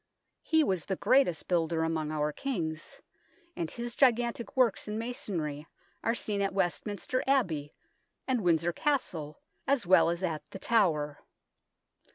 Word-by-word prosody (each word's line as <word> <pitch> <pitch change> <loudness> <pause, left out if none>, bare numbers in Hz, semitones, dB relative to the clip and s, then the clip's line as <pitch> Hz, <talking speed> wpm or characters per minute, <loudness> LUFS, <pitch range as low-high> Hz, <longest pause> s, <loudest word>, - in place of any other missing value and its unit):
He 320 -1 +3
was 185 - 0
the 195 - 0
greatest 255 -6 +2
builder 165 -2 +1
among 160 -2 -1
our 150 -1 0
Kings, 160 - -4 0.5
and 165 -2 -3
his 235 +3 -5
gigantic 240 0 +2
works 240 -6 +3
in 210 +1 -3
masonry 170 -11 -4 0.4
are 230 - +1
seen 205 -3 -2
at 195 -1 -1
Westminster 200 +6 -1
Abbey 170 - +1 0.5
and 255 -3 +1
Windsor 170 -1 +2
Castle 165 - -1 0.3
as 275 -6 +2
well 180 -1 +6
as 170 +2 -2
at 160 -4 -1
The - - -7
Tower. 160 -10 +1
185 Hz, 140 wpm, -30 LUFS, 160-235 Hz, 0.5 s, well